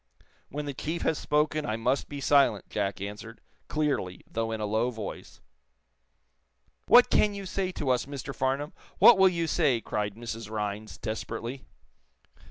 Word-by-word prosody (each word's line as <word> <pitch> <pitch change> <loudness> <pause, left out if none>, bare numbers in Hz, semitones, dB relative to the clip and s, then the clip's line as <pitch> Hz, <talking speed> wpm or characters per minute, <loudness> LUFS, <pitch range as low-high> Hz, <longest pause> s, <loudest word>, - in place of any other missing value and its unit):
"When 150 +1 -4
the 140 - -4
chief 160 +5 -4
has 160 - +1
spoken 150 +1 +1
I 110 - -2
must 125 +4 0
be 145 - -6
silent," 140 -7 +3
Jack 100 -1 -2
answered, 105 +3 -7 0.3
clearly, 140 -12 -1
though 115 0 -3
in 110 - -3
a 105 - -1
low 110 +4 +1
voice. 110 -4 -8 1.5
"What 245 0 +7
can 210 -1 +3
you 200 -1 -6
say 185 0 -2
to 140 -6 -1
us, 125 +1 0
Mr. 140 -1 -6
Farnum? 135 +4 -1 0.2
What 235 -5 +8
will 190 0 +7
you 170 -2 -1
say?" 150 -7 +2
cried 105 -2 -3
Mrs. 115 -2 -6
Rhinds, 105 -4 -4
desperately. 115 - -5
125 Hz, 160 wpm, -28 LUFS, 110-150 Hz, 1.5 s, What